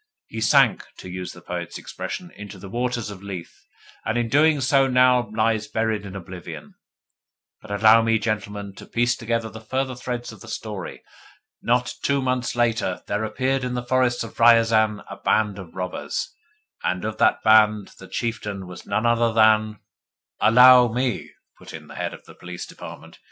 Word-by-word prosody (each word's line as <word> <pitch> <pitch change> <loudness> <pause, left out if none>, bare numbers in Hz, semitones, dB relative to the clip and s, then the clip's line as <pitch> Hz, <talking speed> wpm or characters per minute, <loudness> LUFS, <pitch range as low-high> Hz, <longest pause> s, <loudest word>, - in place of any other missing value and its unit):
He 110 - -7
sank, 110 - +4
to 95 - -10
use 90 0 -5
the 90 - -14
poet's 85 -1 -5
expression, 180 -1 -7
into 105 -1 -10
the 95 +1 -10
waters 120 -1 -2
of 95 -2 -10
Lethe, 95 -4 -7 0.5
and 110 - -1
his 115 -1 -1
doings 145 -2 +3
now 125 -4 +4
lie 110 +1 +1
buried 110 -2 -1
in 95 - -9
oblivion. 90 -3 -9 0.9
But 110 - -14
allow 110 +2 +5
me, 115 0 +2
gentlemen, 105 -2 -3
to - - -11
piece 120 0 +1
together 115 -1 -2
the 110 0 -10
further 130 +4 -2
threads 125 -1 -5
of - - -14
the 120 - -12
story. 105 -4 -6 0.6
Not 125 +1 +1
two 140 0 +1
months 125 -2 -1
later 115 -6 0
there 105 +2 -2
appeared 130 +4 -1
in 125 0 -2
the 125 - -3
forests 125 -1 +1
of 115 - -11
Riazan 115 -2 +4
a - - -8
band 105 -2 0
of 90 -4 -11
robbers: 95 - -4 0.5
and 90 +2 -1
of 110 0 -4
that - - +3
band 110 -2 +4
the 95 - -11
chieftain 105 -3 -4
was 90 0 -11
none 110 - 0
other 115 0 +3
than 110 -2 +3 0.3
" - - -34
"Allow 125 +3 +8
me," 125 +2 -2 0.3
put - - -10
in - - -10
the - - -13
Head - - -4
of - - -17
the - - -14
Police 90 -1 -8
Department. - - -11
110 Hz, 180 wpm, -23 LUFS, 105-120 Hz, 0.9 s, Allow